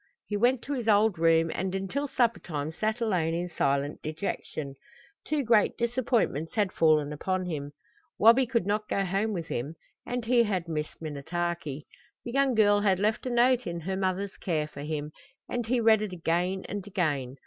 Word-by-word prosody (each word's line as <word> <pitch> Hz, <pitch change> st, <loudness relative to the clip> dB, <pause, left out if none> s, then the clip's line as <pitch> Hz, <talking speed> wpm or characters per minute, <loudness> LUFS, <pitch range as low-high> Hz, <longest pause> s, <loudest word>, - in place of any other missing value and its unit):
He 210 Hz, -, -3 dB
went 240 Hz, +4 st, +2 dB
to 285 Hz, -, -3 dB
his 245 Hz, -5 st, -3 dB
old 210 Hz, -4 st, +4 dB
room, 165 Hz, 0 st, +4 dB
and 190 Hz, +1 st, -2 dB
until 195 Hz, +10 st, -2 dB
suppertime 180 Hz, -, -1 dB
sat 220 Hz, +7 st, -2 dB
alone 175 Hz, -7 st, +1 dB
in 175 Hz, +1 st, -3 dB
silent 140 Hz, -1 st, 0 dB
dejection. 155 Hz, -3 st, -4 dB, 0.5 s
Two 300 Hz, -2 st, 0 dB
great 225 Hz, -3 st, +3 dB
disappointments 235 Hz, -, 0 dB
had 205 Hz, -4 st, +1 dB
fallen 155 Hz, -3 st, +3 dB
upon 185 Hz, +5 st, -2 dB
him. 145 Hz, -4 st, -4 dB, 0.4 s
Wabi 235 Hz, +4 st, +6 dB
could 230 Hz, -6 st, 0 dB
not 210 Hz, +1 st, -1 dB
go 195 Hz, -, 0 dB
home 195 Hz, +4 st, 0 dB
with 170 Hz, -5 st, -4 dB
him 140 Hz, +7 st, -3 dB, 0.3 s
and 245 Hz, -1 st, -4 dB
he 240 Hz, +1 st, +4 dB
had 190 Hz, -6 st, -1 dB
missed 155 Hz, -2 st, -4 dB
Minnetaki. 155 Hz, 0 st, -3 dB, 0.4 s
The 240 Hz, -, -4 dB
young 270 Hz, -1 st, +2 dB
girl 205 Hz, -2 st, +5 dB
had 200 Hz, -2 st, +2 dB
left 215 Hz, +5 st, 0 dB
a -, -, 0 dB
note 245 Hz, 0 st, +3 dB
in 170 Hz, 0 st, -4 dB
her 190 Hz, +4 st, -3 dB
mother's 190 Hz, +1 st, -2 dB
care 155 Hz, -4 st, -1 dB
for 145 Hz, -2 st, -10 dB
him, 150 Hz, 0 st, -4 dB, 0.4 s
and 240 Hz, -2 st, -3 dB
he 250 Hz, +1 st, +2 dB
read 220 Hz, -2 st, +5 dB
it 210 Hz, -3 st, -3 dB
again 180 Hz, +2 st, -1 dB
and 205 Hz, 0 st, -5 dB
again. 145 Hz, -9 st, -1 dB
190 Hz, 180 wpm, -28 LUFS, 160-225 Hz, 0.5 s, Wabi